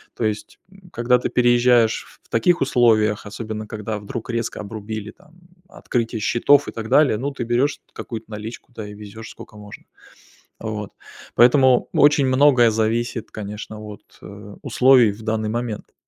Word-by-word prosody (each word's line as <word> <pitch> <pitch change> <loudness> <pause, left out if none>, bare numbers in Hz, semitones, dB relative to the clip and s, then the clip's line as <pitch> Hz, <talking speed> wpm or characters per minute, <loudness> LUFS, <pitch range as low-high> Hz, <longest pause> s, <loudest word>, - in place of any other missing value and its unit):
То - - -4
есть, 110 -1 -3
м, 190 -2 -18
когда 120 +1 +2
ты 125 - -3
переезжаешь 120 -2 +3 0.2
в - - -30
таких 155 +10 +2
условиях, 110 -5 +2
особенно, 110 +1 -6
когда 105 0 -5
вдруг 110 +4 -7
резко 115 -1 -3
обрубили 105 0 -6
там 150 +7 -24 0.3
открытие 115 -6 -3
счетов 120 +6 +3
и - - -4
так 110 -1 -7
далее, 135 -3 +4
ну, 140 +6 -3
ты 135 - -5
берешь 120 +5 0
какую-то 115 -3 -8
наличку, 110 +4 -8
да, 110 -3 -7
и 105 - -9
везешь, 105 +1 -10
сколько 105 - -13
можно. 105 -1 -12 0.8
Вот. 105 -2 -5 0.4
Поэтому 125 +1 +5
очень 145 -1 +4
многое 130 -3 +5
зависит, 115 +1 -2
конечно, 105 +1 -7
от, 105 -2 -10 0.2
э, - - -11
условий 125 -4 +5
в 105 +2 -9
данный 110 -1 -2
момент. 115 -1 -4
115 Hz, 155 wpm, -21 LUFS, 110-125 Hz, 0.8 s, Поэтому